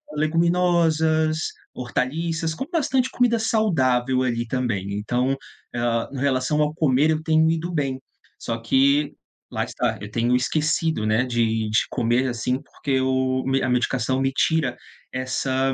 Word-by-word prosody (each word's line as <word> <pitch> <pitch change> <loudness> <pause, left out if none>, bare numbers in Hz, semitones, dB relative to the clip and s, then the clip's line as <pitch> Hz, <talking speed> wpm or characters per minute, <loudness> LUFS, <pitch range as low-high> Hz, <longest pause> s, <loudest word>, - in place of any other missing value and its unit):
leguminosas, 160 -1 +2 0.4
hortaliças, 160 +6 -2
como 265 - -6
bastante 265 -6 +1
comida 245 -2 +2
saudável 130 - +1
ali 120 -2 -1
também. 110 -6 -2
Então, 125 +5 0 0.4
hã, 120 -1 0
em - - -5
relação 135 +2 +1
ao 150 0 +1
comer, 150 -2 +2
eu 155 0 0
tenho 160 0 +3
ido 165 +2 -1
bem. 135 -4 -1 0.4
Só 115 - -3
que, 140 +5 +2 0.4
lá - - -1
está, - - -2
eu 105 0 -8
tenho 120 +2 +1
esquecido, 155 -1 0
né, 110 +3 +2
de 115 -3 0
de 110 - +4
comer, 120 +1 +1
assim, 125 +2 -2
porque 135 -2 -2
o 130 0 +1
me 135 0 +1
a 130 - 0
medicação 125 +1 0
me 135 0 +1
tira 135 -2 +1 0.3
essa 130 +1 -1
135 Hz, 145 wpm, -23 LUFS, 125-160 Hz, 0.4 s, de